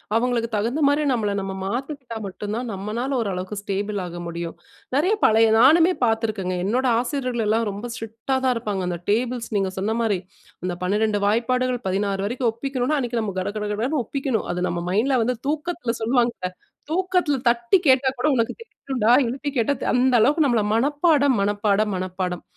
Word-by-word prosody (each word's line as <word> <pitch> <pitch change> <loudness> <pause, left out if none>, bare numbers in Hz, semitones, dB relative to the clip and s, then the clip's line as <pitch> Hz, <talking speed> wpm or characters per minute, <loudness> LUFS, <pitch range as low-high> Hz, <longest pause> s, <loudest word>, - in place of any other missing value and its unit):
அவுங்களுக்கு 235 0 +1
தகுந்தமாரி 285 +7 +2
நம்மள 220 -5 0
நம்ம 195 0 -4
மாத்திக்கிட்டா 250 +3 -4
மட்டும் 205 +2 -5
தான் 245 +1 -3
நம்மனால 210 +7 -3
ஓரளவுக்கு 190 -1 -3
ஸ்டேபிள் 205 +1 -3
ஆக 175 0 -7
முடியும். 170 0 -5 0.4
நிறைய 345 +9 +3
பழைய 225 +1 +5
நானுமே 325 +8 +6
பார்த்துருக்கேங்க. 220 -5 0
என்னோட 245 +6 +1
ஆசிரியர்கள் 250 -2 -2
எல்லாம் 225 +2 +2
ரொம்ப 205 +4 -6
ஸ்ட்ரிக்ட்டா 225 +2 -4
தான் 255 - +3
இருப்பாங்க. 210 -4 -2
அந்த 175 -1 -3
டேபிள்ஸ் 235 +2 0
நீங்க 195 -1 0
சொன்ன 215 +4 -1
மாதிரி 210 -5 +1 0.5
அந்த 180 -1 -2
12 210 +2 +1
வாய்ப்பாடுகள் 245 +3 +1
16 195 0 -1
வரைக்கும் 245 +2 0
ஒப்பிக்கணும். 260 +4 -1
அன்னக்கி 240 -3 -1
நம்ம 200 -3 -4
கடகடகடன்னு 215 +8 -2
ஒப்பிக்கணும். 270 -3 -2
அது 180 +1 -1
நம்ம 170 0 -3
மைண்ட்ல 250 +7 +2
வந்து 250 +2 0
தூக்கத்துல 310 -5 -2
சொல்லுவாங்கல்ல 235 -5 0 0.4
தூக்கத்துல 360 -4 +1
தட்டி 235 +8 +3
கேட்டா 265 -1 +5
கூட 250 - +1
உனக்கு 230 -2 0
தெரியனுன்டா! 265 - -3 0.2
எழுப்பி 270 +4 -3
கேட்டா, 240 +3 +2 0.2
அந்த 255 +1 +3
அளவுக்கு 295 +8 +4
நம்மள 240 -5 +2
மனப்பாடம், 285 +2 +3
மனப்பாடம், 205 +1 +1
மனப்பாடம். 185 -1 -3
230 Hz, 155 wpm, -23 LUFS, 205-260 Hz, 0.5 s, நானுமே